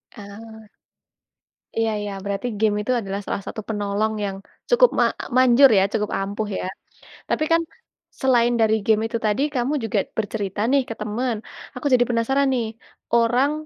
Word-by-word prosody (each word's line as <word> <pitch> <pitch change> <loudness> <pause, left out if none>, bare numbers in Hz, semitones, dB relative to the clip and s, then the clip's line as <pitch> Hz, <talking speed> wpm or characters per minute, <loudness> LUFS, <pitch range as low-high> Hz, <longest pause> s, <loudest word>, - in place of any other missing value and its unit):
Ah. 220 +1 -11 1.1
Iya 225 0 +2
iya. 205 -1 -4
Berarti 200 +4 -3
game 215 -2 +2
itu 215 - -2
adalah 195 -1 -4
salah - - -3
satu 215 - -5
penolong 210 0 -1
yang 195 -1 -3 0.3
cukup - - +6
ma - - +5 0.3
manjur, 255 +1 +7
ya, 190 - +5
cukup 210 -2 0
ampuh 205 +2 -3
ya? - - -4 0.6
Tapi - - +1
kan, 330 0 +5 0.6
selain 240 -2 +3
dari 220 0 +4
game 220 -1 +3
itu 230 - -2
tadi, 215 +5 +1
kamu 255 +4 0
juga 220 -1 -1 0.2
bercerita 205 -2 -3
nih 280 - +4
ke - - -2
teman, 225 +3 -2 0.4
aku 250 +3 -8
jadi 245 -1 +5
penasaran 270 +4 +1
nih, 240 -3 0 0.5
orang 240 +4 +3
225 Hz, 160 wpm, -22 LUFS, 205-250 Hz, 1.1 s, manjur